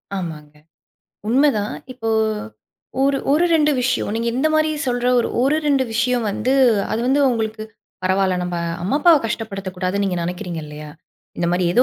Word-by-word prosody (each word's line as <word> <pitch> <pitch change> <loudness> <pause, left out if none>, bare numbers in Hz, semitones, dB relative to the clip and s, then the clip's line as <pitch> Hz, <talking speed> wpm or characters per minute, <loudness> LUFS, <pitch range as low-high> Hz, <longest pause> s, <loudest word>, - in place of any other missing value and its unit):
ஆமாங்க. 155 -5 -6 0.7
உண்மைதான்! 245 -5 +2 0.2
இப்போ 225 -3 -5 0.9
ஒரு 275 0 +2
ஒரு 320 +4 +3
2 300 -1 +4
விஷயம் 250 - 0
நீங்க 230 +1 -1
இந்த 310 +4 +2
மாரி 310 0 +3 0.2
சொல்ற, 245 0 0
ஒர் 235 - +1 0.2
ஒரு 285 +4 +3
2 275 -3 +3
விஷயம் 240 +1 +1
வந்து, 250 +6 -1 0.4
அது 225 - -1
வந்து 275 +2 +3
உங்களுக்கு 220 -2 -2 0.4
"பரவால்ல 190 0 +2
நம்ப 175 -1 -3 0.3
அம்மா 205 +10 0
அப்பாவை 325 -1 +6
கஷ்டப்படுத்தக் 195 -4 -5
கூடாதுன்னு" 190 +2 -1
நீங்க 185 -2 -1
நினைக்கிறீங்க 175 -1 -4
இல்லையா? 150 0 -9 0.5
இந்த 170 - 0
மாரி 180 0 +1
எதோ 245 +7 +5
225 Hz, 155 wpm, -20 LUFS, 185-265 Hz, 0.9 s, அப்பாவை